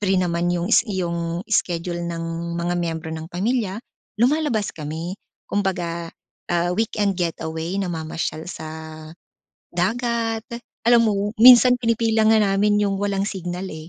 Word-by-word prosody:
free 195 -2 +2
naman 175 -1 0
'yong 175 +2 -1
s - - +6
'yong 170 -3 -2
schedule 175 -4 0
ng 170 0 -4
mga 175 +1 -1
miyembro 165 -1 -3
ng 160 0 -6
pamilya, 205 +2 -1 0.4
lumalabas 255 -5 +2
kami, 160 +4 -5 0.3
kumbaga, 175 -4 -2 0.4
ah, 175 +1 +1
weekend 210 -3 0
getaway 165 0 -3
namamasyal 160 -3 -3
sa 160 -4 -7 1.1
dagat, 225 +4 -1 0.4
alam 235 -1 +6
mo 205 -1 0
minsan 250 0 +9
pinipili 230 -1 +1
nga 220 0 +5
namin 205 0 +2
'yong 200 -1 0
walang 200 -1 0
signal, 180 -1 -4
eh. - - -7
185 Hz, 130 wpm, -22 LUFS, 170-215 Hz, 1.1 s, minsan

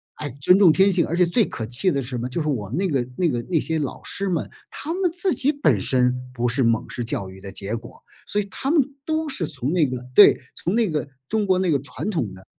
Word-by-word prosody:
哎， 150 - -5
尊 180 +7 +5
重 180 -6 +7
天 195 +5 +4
性， 175 -3 +3
而 170 - -2
且 180 - +5
最 190 +5 +2
可 110 - -6
气 125 - +1
的 140 -3 -1
是 125 - -7
什 125 - -4
么？ 120 +2 -4
就 165 - -3
是 155 - -3
我 110 -10 -2
们 130 - -4
那 190 0 +1
个 130 -6 -1
那 175 -3 +2
个 120 -3 -2
那 165 -4 +2
些 160 0 -1
老 140 - -5
师 200 -1 -1
们， 170 -3 -2 0.2
他 320 +3 -5
们 370 -1 0
自 365 +1 +2
己 285 +3 +5
本 145 - +1
身 125 +1 +2 0.2
不 120 0 -1
是 125 +3 +3
蒙 115 -1 +1
式 120 - -4
教 100 -4 -3
育 95 0 -13
的 100 0 -8
结 100 +3 -2
果， 115 +1 -11 0.2
所 210 - 0
以 200 - -4
他 270 - -3
们 330 - +4 0.3
都 315 0 -1
是 210 - 0
从 140 -2 -2
那 165 -4 +3
个 125 -1 -5
对， 205 - +7 0.2
从 180 - -2
那 230 -5 +2
个 150 -2 -2 0.2
中 215 -1 0
国 185 -1 +2
那 185 -3 +1
个 140 - +2
传 145 +8 -6
统 120 - -2
的 95 0 -14
155 Hz, 295 characters per minute, -22 LUFS, 125-195 Hz, 0.3 s, 重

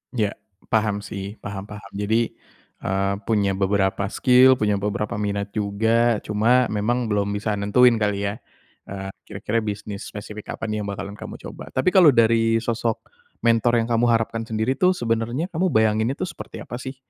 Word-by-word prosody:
Ya 105 -3 +1 0.4
paham 105 -2 +1
sih, 100 +1 -6
paham 100 0 -6
paham. 105 -2 -10
Jadi, 110 +3 0 0.5
eee, 95 +1 0
punya 105 -3 +2
beberapa 95 0 +1
skill 130 +4 +5
punya 105 -3 +1
beberapa 105 0 -2
minat 100 -1 -2
juga. 110 +2 +1
Cuma 120 +4 +3
memang 115 +3 0
belum 100 -1 +1
bisa 105 0 -1
nentuin 115 +3 +4
kali 105 -1 0
ya, 105 - -7 0.5
eee, 95 0 -6 0.2
kira-kira 105 +2 -2
bisnis 105 -1 -5
spesifik 105 0 -8
apa - - -13
nih 105 0 -2
yang - - -5
bakalan 100 0 -5
kamu - - -7
coba. - - -9
Tapi 130 +8 +3
kalau 175 -8 +6
dari 115 0 +4
sosok 115 -1 -1 0.4
mentor 115 +1 +3
yang - - -5
kamu 115 +1 +3
harapkan 115 0 +1
sendiri 110 +3 0
itu 185 0 +4
sebenarnya 120 +8 -1
kamu 180 +3 +1
bayanginnya 110 +1 +2
tuh - - -2
seperti - - -9
apa 120 - -7
sih? 130 +1 -6
110 Hz, 170 wpm, -23 LUFS, 100-115 Hz, 0.5 s, kalau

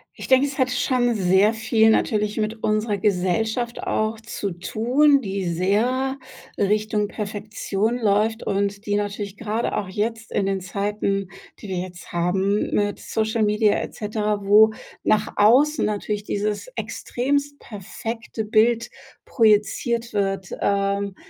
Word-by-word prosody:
Ich - - -8
denke, 260 +1 +5
es 280 0 -5
hat 260 -1 +3
schon 245 -1 +1
sehr 190 +2 +3
viel 220 0 +3
natürlich 210 -1 +1
mit 220 +1 -2
unserer 215 0 0
Gesellschaft 215 +5 0
auch 215 +1 -1
zu 220 -3 -5
tun, 250 - +2
die 195 -4 -3
sehr 220 +10 0 0.4
Richtung 210 +1 +1
Perfektion 210 +1 -3
läuft 220 0 +1
und 200 +1 -1
die 205 - 0
natürlich 205 -1 -4
grade 225 +1 -2
auch 205 -3 -2
jetzt 225 +4 -3
in 195 - +1
den 195 0 0
Zeiten, 200 +1 -2 0.3
die 205 - -9
wir 185 - -2
jetzt 180 -1 -7
haben, 190 +4 0
mit 205 0 0
Social 220 0 -1
Media 210 0 +3
et - - -6
cetera, 210 -1 -2
wo 210 +2 +6 0.3
nach 215 0 +2
außen 265 +9 +4
natürlich 210 0 -2
dieses 210 - -2
extremst 285 +3 -2
perfekte 225 +2 -6
Bild 225 +2 +2 0.3
projiziert 230 +1 +1
wird, 195 -2 -1
ähm, 200 0 0
210 Hz, 135 wpm, -23 LUFS, 200-225 Hz, 0.4 s, wo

